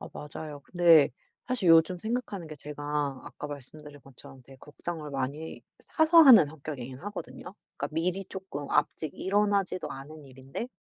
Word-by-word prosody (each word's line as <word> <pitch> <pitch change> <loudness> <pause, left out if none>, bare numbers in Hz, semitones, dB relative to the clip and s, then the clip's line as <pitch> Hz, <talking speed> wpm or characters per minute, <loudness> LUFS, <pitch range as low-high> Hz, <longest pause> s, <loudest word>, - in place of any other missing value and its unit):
아 - - -8
맞아요. 150 0 -8
근데 170 -3 +5 0.4
사실 245 -8 0
요즘 165 +2 +5
생각하는 220 -4 -4
게 155 - -8
제가 145 +1 -9 0.4
아까 - - -8
말씀드린 145 +1 -10
것처럼 130 0 -14
되게 135 +2 -16
걱정을 150 +2 -7
많이 140 +4 -4 0.2
사서 320 0 +3
하는 230 - +9
성격이긴 140 -4 -8
하거든요. 205 -1 -8 0.2
그러니까 - - -3
미리 180 +4 -1
조금 185 -7 -7
아직 150 +1 0
일어나지도 200 -2 0
않은 145 +2 -9
일인데 135 - -7
155 Hz, 360 characters per minute, -28 LUFS, 145-190 Hz, 0.4 s, 하는